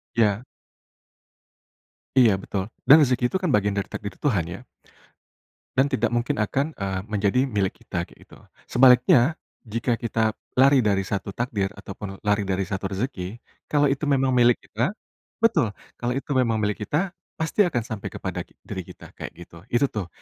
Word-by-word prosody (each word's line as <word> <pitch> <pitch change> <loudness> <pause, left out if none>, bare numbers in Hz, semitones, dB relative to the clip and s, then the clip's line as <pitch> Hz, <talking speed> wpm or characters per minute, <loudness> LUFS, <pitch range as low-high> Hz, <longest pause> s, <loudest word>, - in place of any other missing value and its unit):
Iya. 110 0 +2 1.7
Iya 120 -6 +7
betul, 100 +2 -4 0.2
dan 145 - +10
rezeki 125 -2 +2
itu - - -6
kan 165 - +2
bagian 105 -2 +2
dari 100 - -3
takdir 100 -1 -5
Tuhan 100 - 0
ya. 90 +5 -6 1.2
Dan 140 +2 +3
tidak 115 -3 +2
mungkin 120 -2 0
akan, 135 +9 0
eee, 95 -6 -3
menjadi 105 +4 +2
milik 105 -7 -2
kita, 85 -1 -3
kayak - - -20
gitu. - - -16 0.2
Sebaliknya, 125 +4 +5 0.3
jika 115 +2 -1
kita 110 -2 0 0.2
lari 135 +1 +6
dari 100 -4 +2
1 100 0 -4
takdir 110 -5 -1
ataupun 100 0 -8
lari 105 -1 +1
dari 95 0 0
1 95 +2 -4
rezeki 95 -1 -4 0.3
kalau 145 -2 +3
itu 140 +2 -1
memang 135 -2 +2
milik 120 -1 +5
kita 120 - -1 0.5
betul, 115 - +3 0.3
kalau 120 0 -1
itu 140 +1 -4
memang 115 -3 +2
milik 105 +1 -1
kita, 175 +5 0 0.2
pasti 160 +6 0
akan 120 -8 -1
sampai 110 -3 -5
kepada - - -5
ki - - -27
diri 95 -2 -6
kita, - - -12
kayak - - -7
gitu. 85 +3 -13
Itu 120 +4 +2
tuh 100 -5 -3
115 Hz, 165 wpm, -24 LUFS, 100-130 Hz, 1.7 s, dan